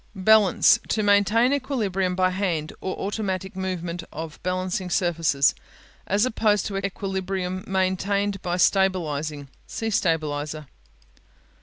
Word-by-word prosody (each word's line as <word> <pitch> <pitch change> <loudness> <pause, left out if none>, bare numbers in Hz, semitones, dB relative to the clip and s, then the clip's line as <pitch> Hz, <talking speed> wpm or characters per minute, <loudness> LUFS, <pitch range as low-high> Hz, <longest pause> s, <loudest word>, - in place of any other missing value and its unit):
Balance 215 +3 +5
To 215 - 0
maintain 210 +5 +4
equilibrium 205 -10 -1
by 185 0 +2
hand 175 -5 -2
or 185 - -3
automatic 190 -2 -3
movement 175 -2 -4
of 160 0 -7
balancing 185 0 -2
surfaces, 165 -6 +2 0.5
as 205 +4 +2
opposed 215 -4 +1
to 195 - -3
equilibrium 190 -1 -3
maintained 195 +1 0
by 175 -1 -2
stabilizing. 155 -7 +1 0.2
See 225 0 -3
"Stabilizer." 155 -4 -1
185 Hz, 110 wpm, -24 LUFS, 175-200 Hz, 0.5 s, Balance